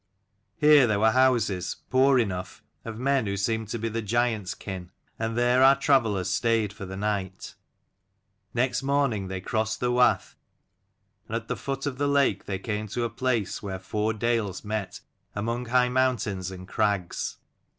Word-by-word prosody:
Here 150 -4 +6
there 105 -2 +1
were 110 +1 +4
houses, 115 -8 +2 0.2
poor 130 +1 +5
enough, 95 -6 -2 0.2
of 115 -1 -6
men 135 -2 +1
who 100 0 -2
seemed 110 +2 -1
to 115 - -3
be 115 0 -3
the 115 +1 -2
giant's 110 -2 0
kin, 95 -3 -7 0.3
and 110 +1 -2
there 125 +1 +3
our 135 +1 +7
travellers 115 -9 +2
stayed 110 +2 +1
for 100 -2 -8
the 95 +1 -7
night. 100 -2 -3 1.0
Next 125 +2 0
morning 135 -8 0
they 95 0 -5
crossed 110 +2 -1
the 125 0 0
wath, 125 0 +2 0.9
and 110 - -4
at 115 0 -4
the - - 0
foot 135 0 -4
of 135 -2 -3
the 145 - +1
lake 140 -1 +2
they 95 - -3
came 105 +2 -4
to 120 +4 -3
a 115 - -2
place 120 -5 -1
where 95 -2 -4
four 105 +3 -2
dales 110 -3 -1
met 105 -3 -4 0.3
among 115 +4 -2
high 125 +1 +3
mountains 125 -8 0
53 95 - -5
and 90 0 -11
crags. 100 -4 -1
110 Hz, 170 wpm, -26 LUFS, 100-125 Hz, 1.0 s, our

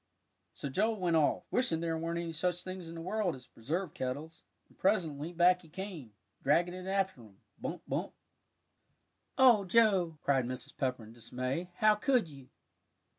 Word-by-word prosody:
So - - -5
Joel 215 +10 0
went 175 -3 +1
off, 155 -2 +3
wishing 170 -10 +1
there 165 -1 -1
weren't 165 +1 -2
any 170 -1 -3
such 175 +2 -1
things 185 -2 -6
in 165 - -8
the 165 - -6
world 190 -1 -1
as 125 -1 -13
preserve 155 +9 -4
kettles, 145 +6 -5 0.3
and - - -24
presently, 170 -6 0
back 180 +1 +4
he 165 - -17
came, 165 - -7 0.3
dragging 170 +5 +3
it 185 0 -7
after 190 -7 0
him 105 -4 -16 0.2
"bump - - -5
bump." - - -2 1.3
"Oh, 245 -6 +7
Joe," 185 -5 +3
cried 135 -3 +2
Mrs. 125 +1 -6
Pepper, 130 -4 -1
in 110 +1 -12
dismay, 130 +8 -4
"how 215 0 +5
could 235 - +2
you!" 135 -3 -13
170 Hz, 170 wpm, -32 LUFS, 140-190 Hz, 1.3 s, Oh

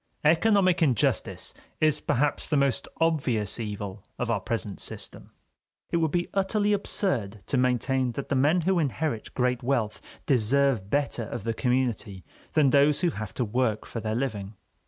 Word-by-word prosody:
Economic 185 +2 +4
injustice 130 -9 +1 0.3
is 155 -1 +2
perhaps 145 +4 0
the 150 - +1
most 140 -1 +1
obvious 135 -11 +1
evil 105 -3 -5
of - - -1
our - - +1
present - - -4
system. - - -7 0.6
It - - +2
would 160 -1 +2
be 175 +2 0
utterly 205 +2 +1
absurd 120 - -1
to 135 - 0
maintain 125 0 +1
that 140 - -5
the - - +1
men 150 +7 +3
who 185 +2 +2
inherit 145 -5 -2
great 125 -1 +1
wealth 120 -4 -1 0.2
deserve 130 -3 +2
better 140 -4 0
of 115 -1 -6
the 115 +1 -1
community 120 -6 -1 0.3
than 145 -4 +4
those 145 +1 +4
who 175 -2 +2
have 105 -6 -6
to 125 - 0
work 110 -1 0
for 115 - -5
their 110 0 -2
living. 110 -5 -3
130 Hz, 160 wpm, -27 LUFS, 110-155 Hz, 0.6 s, Economic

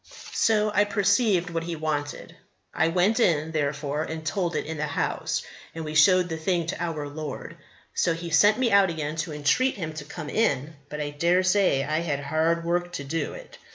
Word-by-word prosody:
So 215 -1 +2
I 205 0 +4
perceived 200 -3 +2
what 165 0 -2
he 170 -1 -3
wanted. 150 -2 -4 0.4
I - - +2
went 185 +7 +2
in, 160 -7 +2
therefore, 145 -1 -1
and 160 0 -5
told 175 -1 -1
it - - -1
in 160 0 -5
the 150 0 -1
house, 145 - -2 0.3
and 160 -1 -5
we 155 - -5
showed 180 +4 +5
the 160 -2 -4
thing 170 +1 0
to 170 +1 -3
our 155 -4 -3
Lord. 150 0 -7 0.4
So 165 - +1
He 170 0 -6
sent 205 +6 +5
me 250 -3 +1
out 200 -2 +5
again 155 -2 -3
to 160 0 -3
entreat 150 - +1
him 160 -5 -5
to 155 -2 -6
come 150 +1 -7
in, 160 - 0
but 150 - -6
I 145 0 -3
dare 170 +5 +2
say 185 -7 +3
I 155 +2 0
had 155 -4 -2
hard 160 +3 0
work 175 +1 -1
to 145 - -4
do 160 +4 -3
it. - - -12
165 Hz, 205 wpm, -26 LUFS, 150-185 Hz, 0.4 s, showed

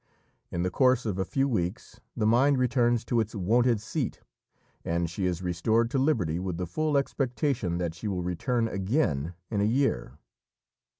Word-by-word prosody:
In 85 - -2
the 90 - -1
course 130 +2 +3
of 100 -4 -2
a 95 - 0
few 135 +8 0
weeks 95 -3 -3 0.2
the 110 - +1
mind 130 +5 +4
returns 120 -2 +2
to 120 - +1
its 110 0 -2
wonted 115 +4 +2
seat, 120 +5 -3 0.6
and 85 +1 0
she 90 +3 -2
is 90 0 -2
restored 110 +7 +1
to 135 - +1
liberty 105 - +1
with 90 -2 -3
the 90 - -2
full 150 - 0
expectation 130 - -1
that 85 -2 -2
she 85 +6 -6
will 90 -3 -2
return 115 +7 0
again 95 - -1 0.2
in 105 -2 0
a - - +3
year. 110 - 0
110 Hz, 175 wpm, -28 LUFS, 90-125 Hz, 0.6 s, mind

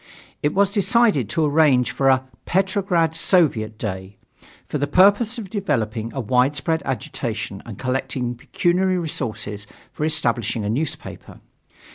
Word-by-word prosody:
It 150 +3 0
was 200 0 +3
decided 205 - +2
to 155 +6 +1
arrange 145 -4 +3
for 135 -1 +2
a 130 0 +3 0.2
"Petrograd 185 -3 +1
Soviet 140 - +2
Day," 95 -2 -5 0.5
for 150 - -3
the 145 - 0
purpose 205 - +4
of 205 -5 -7
developing 115 - -2
a - - -2
widespread 135 +7 +1
agitation 130 -2 -4
and - - -8
collecting 130 -1 -2
pecuniary 180 +9 0
resources 110 - -4 0.3
for - - -4
establishing 120 -8 0
a 105 - 0
newspaper. 150 +5 -5
145 Hz, 130 wpm, -22 LUFS, 120-180 Hz, 0.5 s, purpose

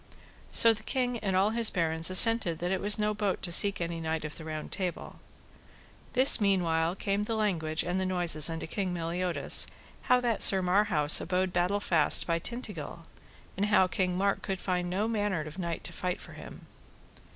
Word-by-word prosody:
So 230 0 +7
the 215 - -11
king 245 -1 -3
and 195 -3 -3
all 195 +3 +1
his 230 -1 +2
barons 165 -2 -1
assented 185 -3 +6
that 175 +2 -4
it 190 - -2
was 205 +1 +3
no 210 0 -2
bote 205 -2 -4
to 175 - -2
seek 200 +3 +4
any 170 -1 -5
knight 160 -1 -4
of 150 - -8
the 165 - -10
Round 155 -1 -8
Table. 185 -3 -6 0.9
This 260 -2 +7
mean 195 -3 +1
while 165 +1 -2
came 200 +1 -3
the 225 - -4
language 165 -8 -2
and 180 +2 -3
the - - -3
noise 175 -4 +3
unto 165 0 -6
King 185 +2 -5
Meliodas, 170 -3 0 0.4
how 250 0 +4
that 235 -3 -2
Sir 190 -1 +6
Marhaus 180 -5 +3
abode 185 +1 -3
battle 180 +3 -1
fast 165 -7 +1
by 165 -1 -2
Tintagil, 180 - -8 0.5
and 200 +2 -2
how 205 -3 +3
King 180 -1 -3
Mark 200 +1 -1
could 190 -1 -5
find 180 -2 -3
no 200 +4 -2
manner 205 -8 -3
knight 170 -2 -5
to - - -9
fight 180 -2 -5
for - - -13
him. - - -13
185 Hz, 190 wpm, -27 LUFS, 170-205 Hz, 0.9 s, So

